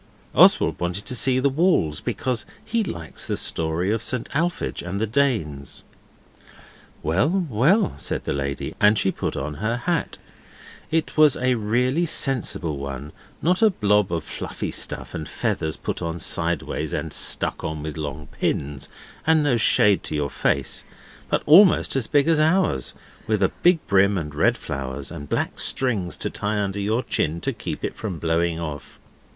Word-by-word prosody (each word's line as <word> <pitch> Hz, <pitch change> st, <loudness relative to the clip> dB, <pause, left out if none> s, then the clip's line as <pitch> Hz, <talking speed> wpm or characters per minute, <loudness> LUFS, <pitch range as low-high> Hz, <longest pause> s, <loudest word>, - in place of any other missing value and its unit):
Oswald -, -, +5 dB
wanted 90 Hz, +3 st, -3 dB
to 130 Hz, -, -1 dB
see 130 Hz, +2 st, +3 dB
the 130 Hz, +2 st, +2 dB
walls, 140 Hz, -, +2 dB
because 125 Hz, -4 st, -2 dB, 0.2 s
he 230 Hz, -1 st, 0 dB
likes 85 Hz, -, -5 dB
the -, -, -1 dB
Story 80 Hz, +4 st, 0 dB
of 110 Hz, 0 st, 0 dB
St 120 Hz, +1 st, -1 dB
Alphege 170 Hz, +4 st, -1 dB
and 90 Hz, +3 st, -4 dB
the 110 Hz, -, +1 dB
Danes. 110 Hz, -, -1 dB, 1.2 s
'Well, 150 Hz, -, +1 dB
well,' 150 Hz, -, +2 dB
said -, -, -2 dB
the -, -, -2 dB
lady, 70 Hz, 0 st, -3 dB
and 105 Hz, +1 st, +5 dB
she 95 Hz, -, +2 dB
put -, -, -4 dB
on 75 Hz, +2 st, -3 dB
her 115 Hz, +2 st, 0 dB
hat; 165 Hz, +7 st, -2 dB, 0.7 s
it 160 Hz, 0 st, -1 dB
was 155 Hz, -3 st, +6 dB
a 130 Hz, 0 st, +1 dB
really 125 Hz, +9 st, +1 dB
sensible 105 Hz, -, +2 dB
one 70 Hz, +1 st, -6 dB, 0.3 s
not 180 Hz, +5 st, +2 dB
a 220 Hz, -, +6 dB
blob 105 Hz, -, +1 dB
of 85 Hz, -2 st, -1 dB
fluffy -, -, -5 dB
stuff -, -, -2 dB
and 80 Hz, -1 st, -5 dB
feathers 80 Hz, -1 st, -2 dB
put -, -, -4 dB
on 85 Hz, 0 st, -3 dB
sideways 85 Hz, -1 st, -1 dB
and -, -, -3 dB
stuck -, -, +1 dB
on 80 Hz, -1 st, -4 dB
with 75 Hz, -1 st, -5 dB
long 75 Hz, -1 st, -5 dB
pins, 70 Hz, -1 st, -2 dB, 0.4 s
and 160 Hz, -1 st, +4 dB
no 140 Hz, -4 st, +2 dB
shade 105 Hz, -3 st, +4 dB
to -, -, -3 dB
your 70 Hz, -2 st, -1 dB
face, 70 Hz, -1 st, 0 dB, 0.5 s
but -, -, 0 dB
almost 175 Hz, +1 st, +6 dB
as 135 Hz, -4 st, 0 dB
big 145 Hz, +1 st, +2 dB
as 165 Hz, -2 st, +3 dB
ours, 155 Hz, -, +1 dB, 0.3 s
with 110 Hz, -2 st, +1 dB
a 95 Hz, -, +2 dB
big 175 Hz, 0 st, +5 dB
brim 100 Hz, 0 st, +3 dB
and 75 Hz, -4 st, -4 dB
red 75 Hz, -, +2 dB
flowers, 70 Hz, 0 st, -5 dB
and 75 Hz, -4 st, -8 dB
black -, -, -2 dB
strings 105 Hz, -, 0 dB
to -, -, -4 dB
tie 105 Hz, +1 st, -2 dB
under 100 Hz, -1 st, -2 dB
your 110 Hz, +5 st, 0 dB
chin 80 Hz, +2 st, -1 dB
to -, -, -2 dB
keep -, -, -6 dB
it -, -, -3 dB
from 100 Hz, -6 st, -5 dB
blowing 85 Hz, +1 st, 0 dB
off. 75 Hz, -4 st, -7 dB
105 Hz, 170 wpm, -23 LUFS, -, 1.2 s, was